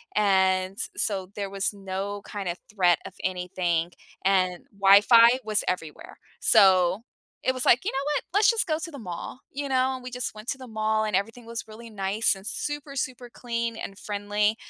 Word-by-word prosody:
and 190 Hz, -1 st, +2 dB, 0.2 s
so 190 Hz, -3 st, 0 dB
there 200 Hz, -2 st, -3 dB
was 195 Hz, +1 st, -1 dB
no 195 Hz, +1 st, -5 dB
kind 200 Hz, -3 st, -5 dB
of 175 Hz, +2 st, -3 dB
threat 180 Hz, -5 st, +3 dB
of -, -, -12 dB
anything, 180 Hz, -2 st, -1 dB, 0.3 s
and 185 Hz, 0 st, +1 dB
Wi-Fi 230 Hz, +5 st, +7 dB
was 215 Hz, -1 st, 0 dB
everywhere, 165 Hz, -4 st, -4 dB, 0.2 s
so, 190 Hz, -2 st, +5 dB, 0.5 s
it 260 Hz, -, +4 dB
was 255 Hz, -, -2 dB
like, 245 Hz, -, +4 dB
"You -, -, 0 dB
know 270 Hz, -, -3 dB, 0.2 s
what? -, -, 0 dB
Let's 410 Hz, +1 st, +5 dB
just 455 Hz, -3 st, +2 dB
go 310 Hz, -2 st, -1 dB
to 335 Hz, -, -4 dB
the 285 Hz, -, -9 dB
mall," 185 Hz, +3 st, -7 dB
you 280 Hz, 0 st, -4 dB
know, 260 Hz, 0 st, +2 dB
and 255 Hz, -1 st, -7 dB
we 250 Hz, -, -6 dB
just 250 Hz, 0 st, -4 dB
went 215 Hz, +2 st, -12 dB
to 275 Hz, -, -2 dB
the 260 Hz, -, -10 dB
mall, 220 Hz, 0 st, 0 dB
and 210 Hz, -3 st, -1 dB
everything 225 Hz, +4 st, -2 dB
was 230 Hz, -1 st, -6 dB
really 225 Hz, +1 st, -11 dB
nice 200 Hz, +2 st, +1 dB
and 190 Hz, -, -12 dB
super, 290 Hz, +1 st, -4 dB
super 250 Hz, -2 st, -4 dB
clean 235 Hz, -1 st, -3 dB
and 195 Hz, -, -7 dB
friendly. 210 Hz, +1 st, 0 dB
210 Hz, 190 wpm, -26 LUFS, 190-245 Hz, 0.5 s, Wi-Fi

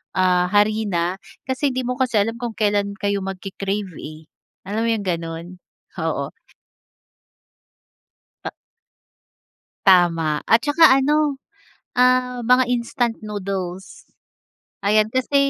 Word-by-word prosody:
ah, 180 Hz, -1 st, +3 dB
harina 205 Hz, -4 st, +1 dB, 0.3 s
kasi 260 Hz, +2 st, 0 dB
hindi 255 Hz, 0 st, -2 dB
mo 250 Hz, +1 st, -2 dB
kasi 255 Hz, -3 st, 0 dB
alam 225 Hz, +3 st, 0 dB
kung 235 Hz, -2 st, -5 dB
kailan 205 Hz, -1 st, 0 dB
kayo 200 Hz, 0 st, 0 dB
magke-crave 195 Hz, +1 st, -4 dB
eh, 155 Hz, +1 st, -10 dB, 0.4 s
alam 215 Hz, +3 st, -1 dB
mo 230 Hz, -, +1 dB
yung 205 Hz, -, -4 dB
ganon, 165 Hz, -1 st, -3 dB, 0.5 s
oo. -, -, -2 dB, 2.2 s
Ta -, -, -4 dB, 1.3 s
Tama 165 Hz, -5 st, +3 dB
at 230 Hz, +1 st, +4 dB
tsaka 290 Hz, +1 st, +5 dB
ano, 295 Hz, -1 st, +1 dB, 0.5 s
ah, 250 Hz, 0 st, +2 dB
mga 250 Hz, +2 st, +4 dB
instant 235 Hz, -1 st, -1 dB
noodles 195 Hz, -3 st, -6 dB, 0.8 s
ayan 215 Hz, +1 st, +3 dB
kasi 260 Hz, +2 st, 0 dB
210 Hz, 110 wpm, -21 LUFS, 185-250 Hz, 2.2 s, tsaka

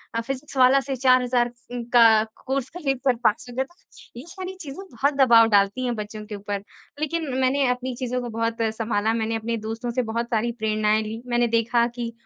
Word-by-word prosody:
अ, 230 Hz, -, +1 dB
फिज़िक्सवाला 265 Hz, +1 st, +2 dB
से 270 Hz, 0 st, -4 dB
₹4,000 250 Hz, -1 st, +3 dB, 0.2 s
उन 245 Hz, -1 st, -4 dB
का 225 Hz, -2 st, +7 dB, 0.2 s
कोर्स 265 Hz, -1 st, -2 dB
खरीद 270 Hz, -6 st, -1 dB
कर 255 Hz, -2 st, +4 dB
पास 215 Hz, +1 st, +2 dB
हो 240 Hz, -, -10 dB
गया। 265 Hz, -, +1 dB
तो 345 Hz, -7 st, -17 dB
ये 260 Hz, -, -10 dB
सारी 375 Hz, 0 st, -6 dB
चीजें 295 Hz, +4 st, -7 dB
बहुत 275 Hz, +5 st, 0 dB
दबाव 235 Hz, -4 st, +6 dB
डालती 205 Hz, +5 st, +2 dB
हैं, 240 Hz, -1 st, -1 dB
बच्चों 210 Hz, 0 st, -7 dB
के 210 Hz, -1 st, -7 dB
ऊपर। 200 Hz, 0 st, -5 dB, 0.4 s
लेकिन 310 Hz, 0 st, -2 dB
मैंने 265 Hz, +1 st, +2 dB
अपनी 250 Hz, 0 st, -2 dB
चीज़ों 250 Hz, 0 st, -3 dB
को 240 Hz, -, -5 dB
बहुत 230 Hz, +1 st, -2 dB
अ, 225 Hz, -, +2 dB
संभाला 220 Hz, -1 st, -1 dB
मैंने 225 Hz, 0 st, -1 dB
अपने 230 Hz, +1 st, -2 dB
दोस्तों 230 Hz, +2 st, -4 dB
से 255 Hz, +1 st, 0 dB
बहुत 235 Hz, +1 st, -1 dB
सारी 235 Hz, +1 st, 0 dB
प्रेरणाएँ 215 Hz, 0 st, +1 dB
ली। 220 Hz, +2 st, -6 dB
मैंने 240 Hz, 0 st, +2 dB
देखा 235 Hz, +1 st, +2 dB
कि 235 Hz, -1 st, -4 dB
240 Hz, 205 wpm, -24 LUFS, 225-260 Hz, 0.4 s, का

